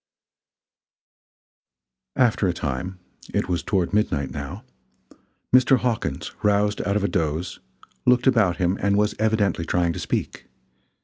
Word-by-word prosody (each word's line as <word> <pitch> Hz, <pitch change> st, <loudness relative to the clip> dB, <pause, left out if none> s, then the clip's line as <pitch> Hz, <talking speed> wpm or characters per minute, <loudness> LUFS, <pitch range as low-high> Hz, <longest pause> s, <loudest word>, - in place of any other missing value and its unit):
After 115 Hz, -5 st, +2 dB
a 90 Hz, -, +1 dB
time 85 Hz, +5 st, -4 dB, 0.4 s
it -, -, 0 dB
was 90 Hz, -2 st, -1 dB
toward 95 Hz, -1 st, -1 dB
midnight 75 Hz, -10 st, 0 dB
now -, -, -6 dB, 0.9 s
Mr. 130 Hz, +1 st, +5 dB
Hawkins 125 Hz, -3 st, -2 dB
roused 105 Hz, 0 st, +2 dB
out 100 Hz, -, -1 dB
of 105 Hz, -, +1 dB
a -, -, +2 dB
doze, 85 Hz, -1 st, -2 dB, 0.5 s
looked 125 Hz, 0 st, +4 dB
about 110 Hz, -9 st, +3 dB
him 90 Hz, +1 st, 0 dB
and 100 Hz, 0 st, +2 dB
was 105 Hz, 0 st, +2 dB
evidently 110 Hz, -5 st, +1 dB
trying 85 Hz, 0 st, 0 dB
to -, -, -6 dB
speak. -, -, -3 dB
100 Hz, 130 wpm, -23 LUFS, 85-110 Hz, 0.9 s, Mr